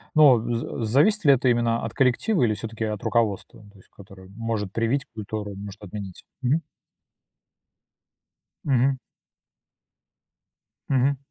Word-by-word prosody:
Ну, 145 Hz, -5 st, +7 dB
а -, -, -1 dB
за 115 Hz, 0 st, -3 dB
зависит 155 Hz, -, +3 dB
ли 140 Hz, -, +8 dB
это 130 Hz, -1 st, +2 dB
именно 120 Hz, -1 st, +1 dB
от 115 Hz, -, -5 dB
коллектива, 135 Hz, -, +2 dB
или 110 Hz, -3 st, +3 dB
всё-таки 115 Hz, +1 st, -5 dB
от 105 Hz, +2 st, -4 dB
руководства, 115 Hz, -1 st, -1 dB
то 100 Hz, -, -20 dB
есть 95 Hz, -, -21 dB
которое 95 Hz, -1 st, -15 dB
может 115 Hz, -3 st, -3 dB
привить 120 Hz, +5 st, 0 dB
культуру, 105 Hz, -1 st, -5 dB
а -, -, -9 dB
может 100 Hz, +1 st, -9 dB
отменить? 100 Hz, -1 st, -8 dB, 0.2 s
Мгм. 135 Hz, +6 st, +1 dB, 2.0 s
Мгм. 135 Hz, 0 st, +2 dB, 1.9 s
Мгм. 135 Hz, +1 st, +2 dB
115 Hz, 135 wpm, -24 LUFS, 105-130 Hz, 2.0 s, ли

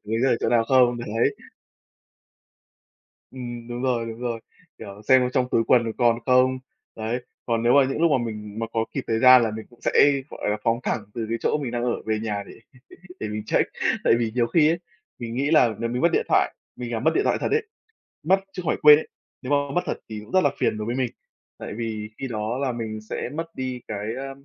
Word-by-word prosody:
đánh 110 Hz, +2 st, -1 dB
rơi 135 Hz, -, +4 dB
ở -, -, +2 dB
chỗ -, -, 0 dB
nào 115 Hz, -1 st, +3 dB
không? 125 Hz, -2 st, +4 dB
Đấy. 115 Hz, -, 0 dB, 2.0 s
Ừm, 120 Hz, -2 st, -7 dB
đúng 120 Hz, +1 st, -5 dB
rồi, 120 Hz, -3 st, 0 dB
đúng 115 Hz, +1 st, -7 dB
rồi. 120 Hz, -2 st, -3 dB, 0.4 s
Kiểu, 100 Hz, -1 st, -10 dB
xem 130 Hz, -1 st, +5 dB
trong 130 Hz, -2 st, +1 dB
túi 115 Hz, -, +3 dB
quần 120 Hz, -3 st, +3 dB
còn 120 Hz, -1 st, +3 dB
không? 130 Hz, 0 st, +3 dB, 0.4 s
Đấy, 115 Hz, +3 st, -3 dB, 0.2 s
còn 115 Hz, -1 st, 0 dB
nếu 120 Hz, -, +4 dB
mà 140 Hz, -2 st, +6 dB
những 135 Hz, +4 st, -2 dB
lúc 170 Hz, -, +4 dB
mà 135 Hz, -, +4 dB
mình 105 Hz, -1 st, -7 dB
mà 115 Hz, -, -1 dB
có 115 Hz, 0 st, 0 dB
kịp -, -, -3 dB
thời 110 Hz, 0 st, +1 dB
gian 130 Hz, 0 st, +8 dB
là 110 Hz, -, -1 dB
mình 110 Hz, 0 st, -7 dB
cũng 120 Hz, -, -22 dB
sẽ, -, -, 0 dB, 0.4 s
gọi -, -, -4 dB
là, 105 Hz, -, 0 dB
phóng 115 Hz, +1 st, +1 dB
thẳng 110 Hz, -, -1 dB
từ 115 Hz, -, -3 dB
cái 115 Hz, -, -1 dB
chỗ -, -, +1 dB
mình 135 Hz, -5 st, -4 dB
đang 120 Hz, 0 st, -2 dB
ở 120 Hz, -, -1 dB
về 110 Hz, -1 st, 0 dB
nhà 105 Hz, -2 st, -3 dB
để -, -, -11 dB, 0.7 s
để 110 Hz, -, -3 dB
mình 105 Hz, 0 st, -4 dB
check. -, -, +1 dB, 0.3 s
Tại -, -, +4 dB
vì 115 Hz, -2 st, -1 dB
nhiều 120 Hz, -2 st, +2 dB
khi 155 Hz, +3 st, +4 dB
ấy, 170 Hz, +1 st, 0 dB, 0.4 s
mình 115 Hz, 0 st, -5 dB
nghĩ 140 Hz, +4 st, 0 dB
là 125 Hz, -8 st, +4 dB
nếu 115 Hz, -, -2 dB
mình 125 Hz, +3 st, -2 dB
mất 170 Hz, -, +5 dB
điện -, -, +1 dB
thoại -, -, +3 dB, 0.2 s
mình 120 Hz, -1 st, -6 dB
làm 115 Hz, -, -2 dB
mất -, -, +4 dB
điện 405 Hz, -, +3 dB
thoại -, -, +1 dB
thật -, -, -1 dB
ấy 445 Hz, 0 st, +1 dB, 0.6 s
mất 190 Hz, +5 st, +4 dB
chứ -, -, -5 dB
không 165 Hz, -, -3 dB
phải -, -, +1 dB
quên 150 Hz, -1 st, +9 dB
ấy, -, -, -8 dB, 0.3 s
nếu 130 Hz, +2 st, -5 dB
mà 145 Hz, -, +5 dB, 0.2 s
mất 180 Hz, -, +3 dB
thật -, -, -2 dB
thì 110 Hz, -1 st, -5 dB
cũng 110 Hz, -, -15 dB
rất 185 Hz, -, +4 dB
là 145 Hz, -, +3 dB
phiền 110 Hz, -, 0 dB
đối 105 Hz, -, -4 dB
với 120 Hz, -, -1 dB
mình. 125 Hz, -3 st, -1 dB, 0.5 s
Tại -, -, -7 dB
vì 110 Hz, -2 st, -4 dB
khi 135 Hz, -, -4 dB
đó 110 Hz, +1 st, -3 dB
là 135 Hz, -2 st, -1 dB
mình 110 Hz, -2 st, -5 dB
sẽ 110 Hz, -, -5 dB
mất 165 Hz, +2 st, -3 dB
đi 130 Hz, -1 st, -4 dB
cái, 105 Hz, 0 st, -4 dB
ờ, 135 Hz, 0 st, -5 dB
120 Hz, 250 wpm, -24 LUFS, 110-130 Hz, 2.0 s, quên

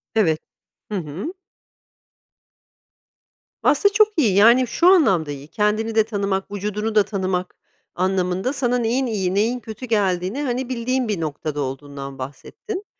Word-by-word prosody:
Evet. 165 Hz, -8 st, +3 dB, 0.5 s
Hı 210 Hz, -, -1 dB
hı. 180 Hz, -, -5 dB, 2.3 s
Aslında 405 Hz, -1 st, +4 dB
çok 425 Hz, +1 st, +6 dB
iyi, 225 Hz, -, +3 dB
yani 235 Hz, +5 st, +6 dB
şu 340 Hz, +9 st, +2 dB
anlamda 195 Hz, -, +4 dB
iyi. 140 Hz, 0 st, -8 dB
Kendini 215 Hz, +4 st, 0 dB
de 220 Hz, -, +5 dB
tanımak, 200 Hz, -3 st, -2 dB
vücudunu 210 Hz, +2 st, -3 dB
da 210 Hz, -, +6 dB
tanımak 185 Hz, -2 st, -2 dB, 0.4 s
anlamında, 185 Hz, +5 st, 0 dB
sana 250 Hz, -3 st, +1 dB
neyin 245 Hz, +3 st, 0 dB
iyi, 195 Hz, -6 st, -1 dB
neyin 230 Hz, +5 st, +1 dB
kötü 225 Hz, +2 st, -8 dB
geldiğini, 200 Hz, +1 st, 0 dB
hani, 255 Hz, -1 st, -2 dB
bildiğin 255 Hz, 0 st, -1 dB
bir 205 Hz, -6 st, -2 dB
noktada 150 Hz, -1 st, -3 dB
olduğundan 140 Hz, 0 st, -6 dB
bahsettin. 370 Hz, -, -7 dB
210 Hz, 135 wpm, -22 LUFS, 180-245 Hz, 2.3 s, çok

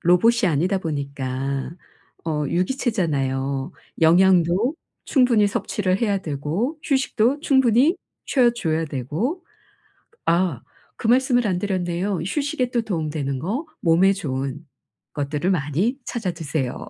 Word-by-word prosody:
로봇이 195 Hz, +6 st, +4 dB
아니다 180 Hz, +6 st, +1 dB
보니까 140 Hz, -4 st, -3 dB, 0.5 s
어 150 Hz, -2 st, -1 dB
유기체잖아요. 145 Hz, -, -1 dB, 0.3 s
영양도 180 Hz, -, +4 dB, 0.3 s
충분히 245 Hz, -6 st, +3 dB
섭취를 195 Hz, -1 st, -1 dB
해야 205 Hz, -4 st, +1 dB
되고 170 Hz, -, -3 dB
휴식도 265 Hz, -1 st, +1 dB
충분히 265 Hz, -, +3 dB, 0.3 s
쉬어줘야 235 Hz, -, +2 dB
되고 160 Hz, -, -3 dB, 0.8 s
아 170 Hz, -6 st, +1 dB, 0.3 s
그 225 Hz, -, -3 dB
말씀을 245 Hz, -2 st, +3 dB
안 180 Hz, -2 st, 0 dB
드렸네요. 185 Hz, -1 st, -1 dB
휴식에 280 Hz, -, -1 dB
또 240 Hz, -2 st, 0 dB
도움 165 Hz, -8 st, -2 dB
되는 140 Hz, -3 st, -3 dB
거. 225 Hz, -, -3 dB
몸에 180 Hz, +4 st, +4 dB
좋은 135 Hz, -3 st, -4 dB, 0.5 s
것들을 150 Hz, +4 st, -1 dB
많이 180 Hz, -, 0 dB
찾아 225 Hz, -7 st, -3 dB
드세요. 155 Hz, -6 st, -4 dB
180 Hz, 265 characters per minute, -22 LUFS, 150-235 Hz, 0.8 s, 로봇이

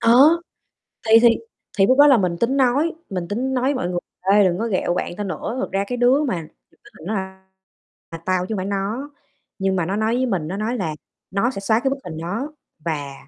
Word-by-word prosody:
Ờ! 230 Hz, +2 st, +5 dB, 0.9 s
Thì 225 Hz, +1 st, +8 dB
thì 235 Hz, -, +7 dB, 0.5 s
thì 195 Hz, -, +5 dB
lúc 260 Hz, -, +4 dB
đó 290 Hz, -, +8 dB
là 270 Hz, -4 st, +7 dB
mình 180 Hz, -4 st, 0 dB
tính 250 Hz, +8 st, +1 dB
nói 275 Hz, +5 st, +2 dB, 0.2 s
mình 180 Hz, -3 st, -3 dB
tính 250 Hz, +7 st, -2 dB
nói 250 Hz, -1 st, 0 dB
với 275 Hz, +2 st, +2 dB
mọi 180 Hz, -8 st, -2 dB
người: 175 Hz, -1 st, -1 dB, 0.3 s
"Ê, 205 Hz, 0 st, +6 dB
đừng 180 Hz, -1 st, +1 dB
có 230 Hz, -, -1 dB
ghẹo 185 Hz, -4 st, 0 dB
bạn 175 Hz, -, -3 dB
tao 210 Hz, -, -2 dB
nữa, 210 Hz, +5 st, -4 dB
thật -, -, -2 dB
ra 195 Hz, +1 st, 0 dB
cái 245 Hz, -, -3 dB
đứa 255 Hz, +5 st, +4 dB
mà 175 Hz, -, -2 dB, 0.4 s
thật -, -, -16 dB
ra 190 Hz, -2 st, -4 dB, 0.7 s
là 165 Hz, -, -5 dB
tao 185 Hz, -1 st, +1 dB
chứ 220 Hz, -, -3 dB
hông -, -, -3 dB
phải 185 Hz, -, -3 dB
nó." 205 Hz, +8 st, -3 dB, 0.5 s
Nhưng 190 Hz, 0 st, +1 dB
mà 175 Hz, -3 st, 0 dB
nó 190 Hz, +4 st, -2 dB
nói 220 Hz, +2 st, +1 dB
với 260 Hz, -, +1 dB
mình, 180 Hz, -10 st, -1 dB
nó 190 Hz, -, -4 dB
nói 225 Hz, +4 st, -2 dB
là 160 Hz, -7 st, -2 dB, 0.4 s
nó 215 Hz, +6 st, +1 dB
sẽ 195 Hz, -, -6 dB
xóa 220 Hz, +3 st, +2 dB
cái 270 Hz, -, 0 dB
bức 275 Hz, -, -2 dB
hình 160 Hz, -3 st, -7 dB
đó 205 Hz, -, -4 dB, 0.3 s
và 145 Hz, -4 st, -3 dB
205 Hz, 240 wpm, -21 LUFS, 185-245 Hz, 0.9 s, Thì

